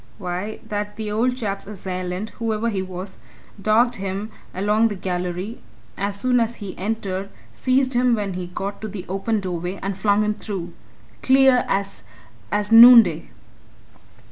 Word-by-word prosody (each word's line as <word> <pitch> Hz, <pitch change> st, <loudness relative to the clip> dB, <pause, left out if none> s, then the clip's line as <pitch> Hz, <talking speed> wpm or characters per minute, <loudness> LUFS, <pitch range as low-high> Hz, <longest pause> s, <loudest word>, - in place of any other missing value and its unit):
Why, 185 Hz, +2 st, -4 dB
that 210 Hz, -1 st, -4 dB
the 215 Hz, -1 st, -4 dB
old 245 Hz, +4 st, +1 dB
chap's 200 Hz, -5 st, -4 dB
assailant, 185 Hz, 0 st, -5 dB
whoever 225 Hz, 0 st, -1 dB
he 195 Hz, -3 st, -1 dB
was, 185 Hz, +1 st, -7 dB, 0.4 s
dogged 235 Hz, +4 st, +3 dB
him 195 Hz, +2 st, -4 dB, 0.2 s
along 210 Hz, +4 st, +2 dB
that 205 Hz, -4 st, -6 dB
gallery 180 Hz, +3 st, -3 dB, 0.4 s
as 200 Hz, +1 st, -3 dB
soon 250 Hz, +2 st, +2 dB
as 230 Hz, 0 st, 0 dB
he 200 Hz, -4 st, -7 dB
entered, 195 Hz, -1 st, -3 dB, 0.2 s
seized 260 Hz, 0 st, +1 dB
him 245 Hz, 0 st, +3 dB
when 205 Hz, -3 st, -3 dB
he 180 Hz, -1 st, -5 dB
got 195 Hz, +3 st, -5 dB
to 220 Hz, -, -4 dB
the 195 Hz, -3 st, -7 dB
open 200 Hz, +3 st, -1 dB
doorway, 180 Hz, 0 st, -4 dB
and 195 Hz, 0 st, -2 dB
flung 205 Hz, +2 st, +2 dB
him 210 Hz, 0 st, 0 dB
through! 190 Hz, -5 st, -6 dB, 0.5 s
Clear 265 Hz, -1 st, +5 dB
as 195 Hz, -8 st, -2 dB, 0.5 s
as 210 Hz, +1 st, -1 dB
noonday!" 225 Hz, -8 st, +8 dB
205 Hz, 150 wpm, -22 LUFS, 190-225 Hz, 0.5 s, noonday